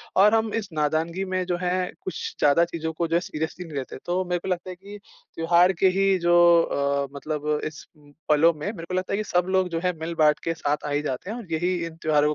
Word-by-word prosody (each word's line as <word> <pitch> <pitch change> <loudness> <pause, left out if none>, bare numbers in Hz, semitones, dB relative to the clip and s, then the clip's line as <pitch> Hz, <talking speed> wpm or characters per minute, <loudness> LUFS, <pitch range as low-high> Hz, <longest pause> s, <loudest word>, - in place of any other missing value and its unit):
और 205 +3 +6
हम 220 -1 0
इस 215 -3 -2
नादानगी 160 +4 0
में 185 -1 -1
जो 175 -1 -1
है 180 0 -1
कुछ 380 -1 -5 0.2
ज़्यादा 150 +4 +4
चीज़ों 160 -1 -4
को 170 +1 -1
जो 165 - 0
है - - +5
सीरियसली 160 +2 -5
नहीं 155 -4 -7
लेते। 130 - -5
तो 180 +2 0
मेरे 175 0 -1
को - - -8
लगता 180 -1 -2
है 185 - -6
कि 200 +3 -11 0.4
त्योहार 170 +3 +4
के 190 - +5
ही 195 -1 +3
जो 175 0 +3 0.3
अ, 140 -1 -1
मतलब 150 +1 -4 0.2
इस 155 -2 -7
उम, 145 -1 -20 0.2
पलों 160 +3 +5
में 150 +4 -6
मेरे 190 -6 -5
को - - -4
लगता 185 +1 -1
है - - +1
कि 215 - -1
सब 180 0 +2
लोग 190 -1 +2
जो 165 -1 -2
है 180 0 +1
मिल-बाँट 160 -2 +2
के 165 - -1
साथ 150 -2 -2
आ - - -3
ही 145 +1 +1
जाते 145 +4 -4
हैं 225 - -4
और 210 -9 -10
यही 175 +3 0
इन 165 - -8
त्योहारों 150 -1 +3
170 Hz, 255 wpm, -25 LUFS, 155-185 Hz, 0.4 s, और